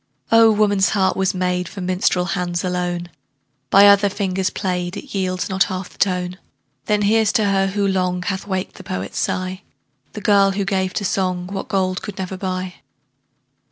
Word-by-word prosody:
Oh! 225 0 +7
woman's 205 -3 +3
heart 190 -1 +1
was 190 +1 0
made 180 -1 -1
For 200 - -9
minstrel 180 0 +1
hands 175 -1 -2
alone; 180 -1 -2 0.6
By 200 +1 +7
other 200 0 +5
fingers 190 -1 -1
played, 180 -1 -3
It 280 - -9
yields 185 -2 -1
not 190 0 +2
half 185 -2 -5
the - - -21
tone. 180 -1 0 0.5
Then 210 -1 +2
here's 220 +1 +3
to 220 -4 +2
her, 195 -1 +2
who 200 +1 0
long 180 -2 0
Hath 190 +1 -3
waked 190 -1 -3
the - - -10
poet's 95 +1 -4
sigh, 185 +1 -2 0.5
The 210 - -7
girl 200 -1 +4
who 200 0 -1
gave 190 -2 -1
to 205 - -1
song 185 -2 -1
What 195 -1 -4
gold 185 -1 0
could 205 - -7
never 190 0 -4
buy. 185 -1 -4
190 Hz, 180 wpm, -20 LUFS, 180-200 Hz, 0.6 s, Oh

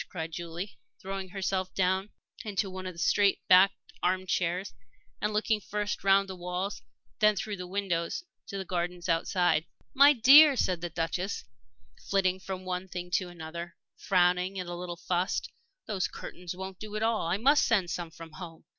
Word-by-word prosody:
cried 165 -2 -5
Julie, 170 +4 -6 0.2
throwing 195 0 -5
herself 190 -1 -2
down 190 +2 +1 0.3
into 200 -2 -2
one 185 0 -6
of 185 - -6
the - - -16
straight 200 +3 +3
backed 185 +1 +7 0.3
arm 185 +1 +1
chairs 180 - -1 0.5
and 210 +1 0
looking 215 0 +1
first 210 +1 -3
round 195 0 +4
the 190 - -6
walls 180 +3 -3
and 110 - -34 0.3
then 210 0 +5
through 205 +1 -3
the 180 0 -6
windows 185 - -2 0.2
to 200 - -5
the 190 - -4
gardens 175 0 -3
outside. 170 -1 +2 0.3
"My 280 +2 +7
dear," 280 +4 +8
said 185 -7 0
the 175 - -3
Duchess, 170 +4 -2 0.7
flitting 190 -1 +2
from 190 -1 -6
one 185 0 -3
thing 180 -1 -6
to 185 0 0
another, 170 0 -7 0.2
frowning 180 +1 +2
and 180 - -4
a 175 - -5
little 175 0 -6
fussed, 180 +2 -1 0.3
"those 195 -4 -1
curtains 180 0 -8
won't 190 0 -7
do 215 -1 -7
at 215 - -1
all. 225 -6 +1
I 175 +3 +1
must 280 +7 +4
send 195 -7 +2
some 170 +1 -4
from 160 0 -11
home." 165 +1 -10
185 Hz, 180 wpm, -29 LUFS, 175-195 Hz, 0.7 s, dear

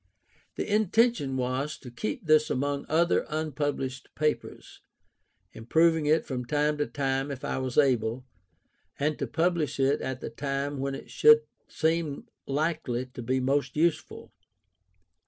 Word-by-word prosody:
The - - -2
intention 215 - +2
was 130 +4 -2
to 125 - -11
keep 215 - -4
this 155 -1 +4
among 140 +2 -1
other 170 +2 +3
unpublished 145 -4 -3
papers, 150 0 -3 0.7
improving 160 +6 +2
it 155 +1 +3
from 130 -4 -3
time 150 +3 0
to 145 - 0
time 135 +2 -1
if 135 -2 -6
I - - -2
was 130 -2 -4
able, 125 -3 +2 0.7
and 150 +1 -1
to - - -2
publish 165 -4 0
it 135 +1 +2
at 130 -1 -4
the - - -6
time 140 0 -3
when 135 0 -2
it - - -10
should 455 0 +6 0.2
seem 160 -3 -1 0.2
likely 140 -4 -1
to - - -7
be 130 +3 0
most 140 +3 0
useful. 160 0 -1
145 Hz, 140 wpm, -28 LUFS, 130-160 Hz, 0.7 s, should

